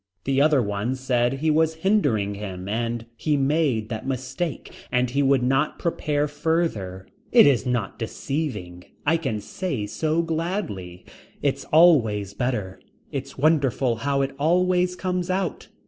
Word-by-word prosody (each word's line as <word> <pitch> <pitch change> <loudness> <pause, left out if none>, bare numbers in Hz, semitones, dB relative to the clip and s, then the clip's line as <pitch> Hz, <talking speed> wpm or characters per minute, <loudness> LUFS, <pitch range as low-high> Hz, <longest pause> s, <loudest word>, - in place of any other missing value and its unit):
The 135 0 +1
other 145 -3 +4
one 105 +5 -2
said 125 -1 +1
he 155 +4 0
was 160 +1 +2
hindering 125 - +2
him 95 -2 -6
and 115 +2 -2
he 150 +5 0
made 135 -6 +1
that 110 +2 -5
mistake 135 +4 -4 0.2
and 125 0 +2
he 140 +3 +1
would 135 -2 +3
not 135 +4 +1
prepare 150 -3 -1
further. 145 - -1 0.3
It 240 - +8
is 135 -2 +3
not 120 -5 -2
deceiving. 110 - -4 0.2
I 160 +3 +3
can 135 -10 -2
say 135 - -3
so 155 +10 0
gladly. 160 - -3 0.4
It's 140 -1 0
always 115 - +4
better. 105 -5 -3 0.3
It's - - -5
wonderful 135 -5 +2
how 140 +3 0
it 135 0 -3
always 180 +3 +2
comes 180 -1 -2
out. 185 -1 -2
135 Hz, 145 wpm, -24 LUFS, 110-160 Hz, 0.4 s, It